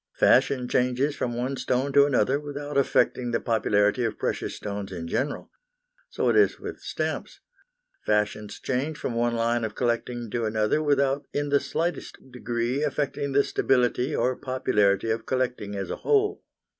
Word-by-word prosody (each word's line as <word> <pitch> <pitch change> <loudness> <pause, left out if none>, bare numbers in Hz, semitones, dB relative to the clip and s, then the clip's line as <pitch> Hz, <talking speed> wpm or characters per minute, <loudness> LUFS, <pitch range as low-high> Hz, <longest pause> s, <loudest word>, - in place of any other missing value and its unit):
Fashion 125 -3 +3
changes 125 +4 +1
from 120 -1 -2
one 130 +3 -2
stone 130 +3 -1
to 140 0 +6
another 135 0 +2
without 145 0 -6
affecting 130 -2 +2
the 115 - 0
popularity 105 0 +2
of 115 - -2
precious - - -2
stones 100 -1 -5
in 85 -3 -5
general. 140 - -2 0.6
So - - -1
it - - +2
is 420 - +4
with - - -7
stamps. - - -4 0.7
Fashions 105 0 0
change 140 +4 -2
from 120 - -3
one 120 0 +1
line 115 +1 +1
of 110 -2 -3
collecting 120 -1 -2
to 120 -2 -1
another 110 +6 +1
without 140 -2 +1
in 145 0 -1
the 140 0 +4
slightest 165 0 -3
degree 120 +2 -2
affecting 140 -2 -2
the 140 +1 +5
stability 125 +2 +1
or 130 +1 +1
popularity 110 -6 +1
of 115 0 -3
collecting 125 -6 -2
as 100 -1 -4
a - - -3
whole. 420 -2 +1
125 Hz, 160 wpm, -26 LUFS, 115-140 Hz, 0.7 s, to